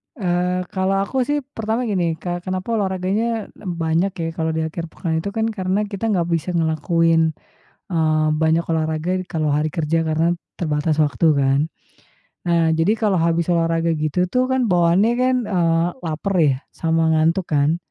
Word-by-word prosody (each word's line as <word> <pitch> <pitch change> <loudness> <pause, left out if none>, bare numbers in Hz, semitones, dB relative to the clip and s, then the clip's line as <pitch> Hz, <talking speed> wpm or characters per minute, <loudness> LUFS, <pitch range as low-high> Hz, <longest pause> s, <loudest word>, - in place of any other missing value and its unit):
Eee, 180 -3 0
kalau 190 0 0
aku 255 +4 -1
sih 290 -1 0
pertama 225 -2 -3
gini, 180 -7 0
ke 175 +1 -4
kenapa 185 +4 -3
olahraganya 200 +3 -1
banyak 170 0 -1
ya 165 -2 -3
kalau 160 0 -2
di 160 - 0
akhir 165 +1 -4
pekan, 160 -1 -3
itu 200 - -3
kan 220 0 +1
karena 190 0 -1
kita 205 +2 -4
nggak 175 -5 +1
bisa 165 +1 -1
ngelakuin, 165 0 +2 0.6
eee, 155 -1 +2
banyak 160 +2 +2
olahraga 160 +1 -1
di - - -6
kalau 155 -3 0
hari 150 +2 +1
kerja 165 0 0
karena 160 +2 +2 0.2
terbatas 155 -1 0
waktu 150 +3 +1
kan. 135 0 +2 0.9
Nah 165 -1 +3
jadi 165 +7 +2
kalau 205 -4 +1
habis 170 0 +1
olahraga 165 0 +1
gitu 155 +4 0
tuh 255 +3 +1
kan 260 -2 +2
bawaannya 175 +6 +3
kan, 255 0 +3
eee, 170 -3 +1 0.2
lapar 165 +5 -2
ya, 140 -4 +3 0.2
sama 165 -1 +1
ngantuk 165 +3 +2
kan. 150 +3 +2
170 Hz, 165 wpm, -21 LUFS, 160-190 Hz, 0.9 s, Nah